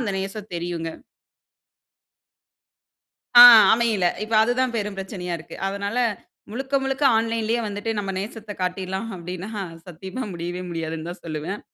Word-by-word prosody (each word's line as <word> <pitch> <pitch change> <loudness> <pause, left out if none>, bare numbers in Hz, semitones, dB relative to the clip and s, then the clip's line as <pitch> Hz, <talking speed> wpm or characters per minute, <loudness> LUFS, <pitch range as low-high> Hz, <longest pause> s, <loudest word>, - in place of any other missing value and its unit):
அந்த 205 -6 -2
நேசம் 195 +2 -6
தெரியும்ங்க. 170 -1 -4 2.4
ஆ, 240 - +12 0.3
அமையல. 225 -5 +1 0.2
இப்ப 220 - -6
அதுதான் 245 +1 0
பெரும் 210 -2 -3
பிரச்சனையா 185 -2 -5
இருக்கு. 160 - -11
அதனால, 200 +3 -3 0.5
முழுக்க 265 +4 -3
முழுக்க 270 +2 -2
ஆன்லைன்‌லேயே 230 +1 0
வந்துட்டு 205 +2 -3
நம்ம 195 -1 -3
நேசத்த 215 +1 -7
காட்டிர்லாம் 190 +3 -3
அப்டீன்னா, 180 +4 -7 0.4
சத்தியமா 190 +9 -6
முடியவே 175 +1 -5
முடியாதுனு 165 -1 -4
தான் 175 - -9
சொல்லுவேன். 160 +5 -4
195 Hz, 125 wpm, -23 LUFS, 175-225 Hz, 2.4 s, ஆ